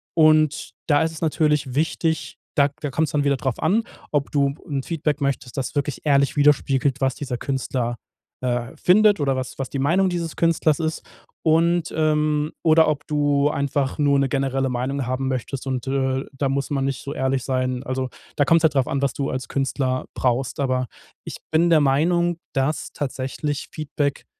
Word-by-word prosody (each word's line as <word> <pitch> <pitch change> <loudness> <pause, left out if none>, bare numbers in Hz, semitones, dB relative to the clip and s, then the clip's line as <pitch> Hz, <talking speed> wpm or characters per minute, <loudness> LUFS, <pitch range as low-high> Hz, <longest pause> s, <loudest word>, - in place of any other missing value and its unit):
und 155 -2 +4 0.2
da 145 -2 +4
ist 160 - -1
es 160 - -9
natürlich 150 -4 +1
wichtig, 160 +1 -1 0.2
da 140 0 +4
da 145 - -2
kommt's 160 +4 0
dann 145 -1 +2
wieder 140 -1 +2
drauf 130 -4 -2
an, 220 +4 +3 0.3
ob 145 -2 0
du 140 -1 +2
'n 140 -4 -2
Feedback 150 -2 -2
möchtest, 140 -3 -2
das 135 +1 -3
wirklich 145 -1 -2
ehrlich 140 -2 +3
widerspiegelt, 140 -2 +2
was 135 -2 +1
dieser 135 -4 -4
Künstler, 125 -2 -2 0.5
äh, 125 0 -2
findet 205 +2 +4
oder 135 -2 +1
was 130 -1 -5
was 135 -2 -3
die 140 - -4
Meinung 175 +8 +3
dieses 170 -2 -3
Künstlers 165 -2 +2
ist 160 0 -2 0.4
und, 165 +1 +2
ähm 155 -1 +1
oder 160 0 +5
ob 150 -2 -3
du 145 -1 +2
einfach 140 -2 -1
nur 140 -1 +3
'ne 135 - +2
generelle 135 -1 0
Meinung 130 +2 -2
haben 130 +1 -1
möchtest 130 +1 -4
und, 130 -1 -3
äh, 135 0 0
da 135 0 0
muss 140 0 -1
man 135 -2 0
nicht 135 -1 -2
so 140 - -5
ehrlich 130 -2 0
sein. 130 -1 -1
Also 130 0 -3 0.3
da 145 - +3
kommt's 165 +2 +4
halt 160 -2 +3
drauf 135 -2 +2
an, 140 - -1
was 140 -2 +1
du 140 0 -2
als 130 -1 -4
Künstler 135 -1 -1
brauchst. 125 +3 -1
Aber 130 -2 0 0.4
ich - - -7
bin 165 +2 +3
der 165 -2 +6
Meinung, 170 +5 +2 0.2
dass 135 +3 -1
tatsächlich 140 +2 -3
Feedback 145 -2 -3
140 Hz, 185 wpm, -23 LUFS, 135-155 Hz, 0.5 s, der